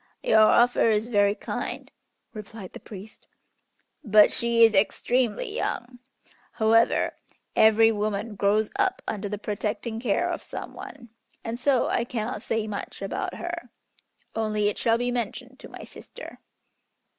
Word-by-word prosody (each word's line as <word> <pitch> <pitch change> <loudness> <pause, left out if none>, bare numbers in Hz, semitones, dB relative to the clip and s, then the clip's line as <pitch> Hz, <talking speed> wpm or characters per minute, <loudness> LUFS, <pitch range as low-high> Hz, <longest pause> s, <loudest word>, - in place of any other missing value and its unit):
"Your 220 - +4
offer 235 +2 +5
is 220 +2 +1
very 205 -2 +3
kind," - - -5 0.4
replied 210 -3 -9
the - - -8
priest, 205 +1 -12 0.8
"but 210 -3 +6
she 235 0 +2
is 225 -1 +6
extremely 240 - 0
young. 245 - -3 0.5
However 225 +1 +3 0.4
every 220 +1 +6
woman 210 0 -2
grows 205 +2 +1
up 385 -2 +1
under 205 -1 -3
the 210 - -3
protecting 215 +2 -3
care 230 -4 0
of - - -3
some - - -8
one, 240 -4 -10 0.3
and 230 +1 -4
so 260 -1 +2
I 235 - 0
cannot 230 -2 -4
say 225 -2 -2
much 210 -2 -6
about 370 - -3
her, 345 -6 -6 0.7
only 215 -2 0
it 210 - -5
shall 230 -1 +2
be 245 +1 -1
mentioned 245 +2 -4
to - - -11
my - - -10
sister." - - -12
225 Hz, 145 wpm, -26 LUFS, 210-240 Hz, 0.8 s, but